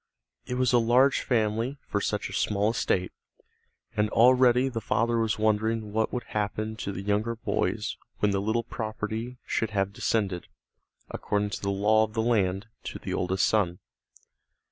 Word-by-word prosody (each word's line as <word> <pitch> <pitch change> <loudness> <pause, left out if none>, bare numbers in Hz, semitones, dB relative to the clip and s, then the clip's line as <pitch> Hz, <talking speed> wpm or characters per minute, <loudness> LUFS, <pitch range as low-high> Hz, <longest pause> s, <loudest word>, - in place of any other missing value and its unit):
It 125 - -2
was 125 0 +2
a 120 - +6
large 125 +4 +4
family 115 +3 0
for 100 - -1
such 105 0 -1
a - - -9
small 105 +1 +1
estate, 90 -5 0 0.8
and 105 0 +1
already 125 +2 +5
the 120 -4 -3
father 115 +2 +1
was 110 -1 0
wondering 110 0 0
what 110 0 +1
would 125 - -3
happen 110 +1 -3
to 100 - -4
the 95 0 -6
younger 105 +3 0
boys 115 - -2 0.2
when 105 - +2
the 100 0 0
little 110 +3 0
property 110 +2 -4
should 115 - -1
have 100 -2 -1
descended, 100 -6 -1 0.6
according 105 0 -1
to - - -4
the 100 - -1
law 105 +2 +3
of 110 -1 -4
the 110 - +1
land, 100 -4 +1 0.2
to - - -5
the - - -5
oldest 95 +1 +1
son. 95 -5 +1
110 Hz, 165 wpm, -27 LUFS, 105-115 Hz, 0.8 s, a